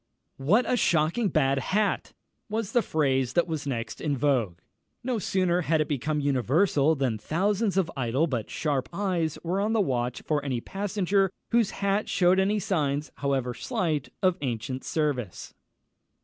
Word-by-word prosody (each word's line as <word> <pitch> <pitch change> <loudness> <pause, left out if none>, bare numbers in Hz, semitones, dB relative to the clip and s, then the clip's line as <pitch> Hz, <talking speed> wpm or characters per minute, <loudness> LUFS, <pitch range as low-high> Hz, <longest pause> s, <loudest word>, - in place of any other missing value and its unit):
"What 180 - +2
a 250 - +2
shocking 170 +4 +2
bad 135 -4 +2
hat!" 205 +9 0 0.4
was 215 -1 -2
the 240 - +3
phrase 135 - 0
that 175 - +3
was 155 -4 -4
next 115 -4 -4
in 145 -3 -1
vogue. 120 -10 +1 0.5
No 245 -2 -1
sooner 180 -2 +1
had 160 -1 +1
it 155 - +1
become 150 +2 -1
universal, 145 - +2
than 130 -6 -1
thousands 195 - 0
of 175 -3 +1
idle 130 +3 +1
but 125 -9 -3
sharp 140 -5 -1
eyes 170 -4 -1
were 180 +4 0
on 215 +2 0
the 225 - +2
watch 125 - -1
for 150 -2 +1
the 130 -4 -1
passenger 195 - 0 0.2
whose 230 -3 +3 0.2
hat 200 +2 +1
shewed 180 +1 +3
any 200 +2 +2
signs, 150 -6 -1
however 135 -3 -1
slight, 155 0 -2
of 185 -1 +3
ancient 130 0 -3
service. 140 - -2
155 Hz, 160 wpm, -27 LUFS, 135-190 Hz, 0.5 s, the